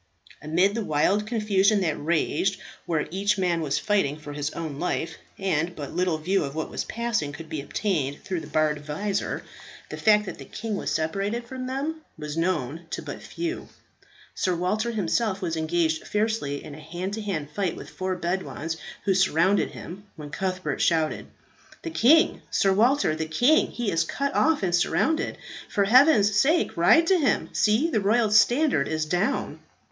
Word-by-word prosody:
Amid 175 Hz, +6 st, +2 dB
the 230 Hz, 0 st, -2 dB
wild 195 Hz, +6 st, +1 dB
confusion 210 Hz, -2 st, +2 dB
that 160 Hz, -5 st, 0 dB
raged, 170 Hz, +4 st, 0 dB, 0.3 s
where 160 Hz, -3 st, 0 dB
each 200 Hz, +3 st, +1 dB
man 175 Hz, -3 st, +1 dB
was 145 Hz, -3 st, 0 dB
fighting 195 Hz, -9 st, +1 dB
for 150 Hz, -1 st, -9 dB
his 145 Hz, 0 st, -2 dB
own 155 Hz, -4 st, -6 dB
life, 175 Hz, -2 st, -2 dB, 0.2 s
and 175 Hz, -3 st, -1 dB
but 145 Hz, -2 st, -7 dB
little 180 Hz, -1 st, +1 dB
view 185 Hz, +5 st, 0 dB
of 140 Hz, 0 st, -5 dB
what 160 Hz, -, -3 dB
was -, -, -3 dB
passing 230 Hz, -10 st, -2 dB
could 160 Hz, +2 st, -9 dB
be 155 Hz, -3 st, -3 dB
obtained 145 Hz, -3 st, -2 dB
through 185 Hz, -3 st, -3 dB
the -, -, -9 dB
barred 150 Hz, -1 st, 0 dB
visor, 195 Hz, +7 st, -2 dB, 0.5 s
the -, -, -5 dB
fact 210 Hz, -1 st, +4 dB
that -, -, -7 dB
the -, -, -9 dB
king 220 Hz, -1 st, -4 dB
was -, -, -3 dB
separated 200 Hz, +9 st, -2 dB
from 255 Hz, 0 st, -6 dB
them 290 Hz, +5 st, -3 dB, 0.2 s
was 150 Hz, 0 st, -6 dB
known 165 Hz, -2 st, -1 dB
to -, -, -5 dB
but -, -, -7 dB
few. 340 Hz, +1 st, -5 dB, 0.6 s
Sir 185 Hz, -1 st, 0 dB
Walter 205 Hz, +7 st, 0 dB
himself 210 Hz, -1 st, 0 dB
was 170 Hz, -4 st, -2 dB
engaged 160 Hz, 0 st, 0 dB
fiercely 210 Hz, -10 st, -1 dB
in 145 Hz, -, -9 dB
a 150 Hz, -, -10 dB
hand 175 Hz, +5 st, -5 dB
to 220 Hz, -, -3 dB
hand 160 Hz, -8 st, -4 dB
fight 185 Hz, +1 st, -1 dB
with -, -, -9 dB
four 185 Hz, 0 st, -3 dB
Bedouins 165 Hz, -3 st, -3 dB, 0.3 s
who 195 Hz, -, +3 dB
surrounded 190 Hz, +1 st, +3 dB
him, 195 Hz, +4 st, -9 dB
when 150 Hz, -2 st, -9 dB
Cuthbert 185 Hz, -3 st, -2 dB
shouted, 160 Hz, -2 st, +1 dB, 0.6 s
"The 335 Hz, -, -4 dB
king, 320 Hz, +2 st, +4 dB
Sir 195 Hz, -1 st, +2 dB
Walter! 235 Hz, -, +3 dB
the 160 Hz, 0 st, -3 dB
king! 245 Hz, -, +3 dB
He 235 Hz, -4 st, -2 dB
is 165 Hz, 0 st, +2 dB
cut 280 Hz, +11 st, -2 dB
off 320 Hz, -7 st, +2 dB
and 175 Hz, -2 st, 0 dB
surrounded! 315 Hz, -, +1 dB, 0.3 s
For 200 Hz, -, +1 dB
heaven's 220 Hz, -2 st, +5 dB
sake 310 Hz, +10 st, +2 dB
ride 250 Hz, -, +5 dB
to 375 Hz, 0 st, +3 dB
him. 285 Hz, -, +1 dB
See! 225 Hz, +11 st, +2 dB
the 215 Hz, -, +1 dB
royal 215 Hz, +2 st, +2 dB
standard 240 Hz, -, +4 dB
is 155 Hz, -1 st, -1 dB
down." 180 Hz, -, -1 dB
190 Hz, 180 wpm, -25 LUFS, 160-215 Hz, 0.6 s, heaven's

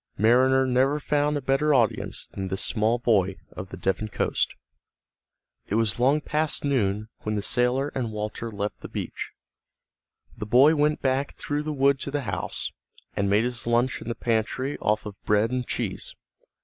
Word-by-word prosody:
Mariner 130 Hz, +4 st, +4 dB
never 130 Hz, +3 st, +2 dB
found 145 Hz, 0 st, +1 dB
a 140 Hz, -, -5 dB
better 140 Hz, +3 st, +2 dB
audience 115 Hz, -4 st, +1 dB
than 95 Hz, -1 st, -6 dB
this 95 Hz, +1 st, -1 dB
small 110 Hz, +2 st, +1 dB
boy 100 Hz, -6 st, +2 dB, 0.2 s
of 90 Hz, +1 st, -8 dB
the 95 Hz, -, -8 dB
Devon 95 Hz, +4 st, -1 dB
coast. 105 Hz, -, -1 dB, 1.1 s
It 100 Hz, -, -1 dB
was 115 Hz, -1 st, +1 dB
long 140 Hz, +5 st, +3 dB
past 150 Hz, 0 st, 0 dB
noon 110 Hz, -6 st, 0 dB
when 110 Hz, 0 st, -3 dB
the 105 Hz, -, -2 dB
sailor 125 Hz, +5 st, +1 dB
and 120 Hz, -4 st, -2 dB
Walter 105 Hz, +2 st, -4 dB
left 105 Hz, 0 st, -4 dB
the -, -, -7 dB
beach. -, -, -5 dB, 1.1 s
The 105 Hz, -, -6 dB
boy 135 Hz, +8 st, +6 dB
went 150 Hz, 0 st, +1 dB
back 135 Hz, +1 st, 0 dB
through 145 Hz, 0 st, -2 dB
the 155 Hz, +1 st, -3 dB
wood 140 Hz, -1 st, +3 dB
to -, -, -4 dB
the 145 Hz, +1 st, -1 dB
house, 125 Hz, -, -3 dB, 0.4 s
and 100 Hz, 0 st, 0 dB
made 105 Hz, +2 st, +4 dB
his 120 Hz, -1 st, -3 dB
lunch 120 Hz, +2 st, +1 dB
in -, -, -9 dB
the 120 Hz, -, -2 dB
pantry 115 Hz, +4 st, -1 dB
off 105 Hz, 0 st, 0 dB
of 105 Hz, -2 st, -9 dB
bread 105 Hz, +2 st, +2 dB
and 125 Hz, -1 st, -2 dB
cheese. -, -, -3 dB
120 Hz, 175 wpm, -26 LUFS, 105-135 Hz, 1.1 s, boy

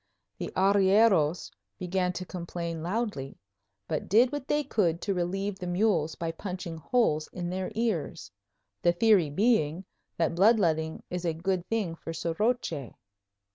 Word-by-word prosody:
The -, -, -4 dB
arrieros 190 Hz, -4 st, +3 dB, 0.3 s
began 180 Hz, +2 st, -1 dB
to 185 Hz, -, -5 dB
complain 170 Hz, -2 st, -5 dB
loudly, 175 Hz, -, -3 dB, 0.5 s
but -, -, -3 dB
did 235 Hz, +5 st, +5 dB
what 290 Hz, -2 st, -5 dB
they 295 Hz, 0 st, +1 dB
could 180 Hz, -, +1 dB
to 200 Hz, -, -1 dB
relieve 190 Hz, +2 st, -2 dB
the 180 Hz, -, -5 dB
mules 175 Hz, -4 st, +1 dB
by 165 Hz, -1 st, -3 dB
punching 180 Hz, -1 st, -6 dB
holes 160 Hz, -5 st, +1 dB
in 175 Hz, -1 st, -4 dB
their 185 Hz, +1 st, -3 dB
ears; 200 Hz, -, -2 dB, 0.5 s
the 175 Hz, -, +3 dB
theory 195 Hz, -4 st, +4 dB
being 185 Hz, -1 st, +1 dB, 0.3 s
that 165 Hz, 0 st, +1 dB
bloodletting 170 Hz, -5 st, +2 dB
is 180 Hz, 0 st, -3 dB
a 170 Hz, -2 st, 0 dB
good 180 Hz, +2 st, -2 dB
thing 215 Hz, -7 st, -1 dB
for 165 Hz, 0 st, -7 dB
soroche. 165 Hz, -, -2 dB
180 Hz, 140 wpm, -28 LUFS, 165-205 Hz, 0.5 s, did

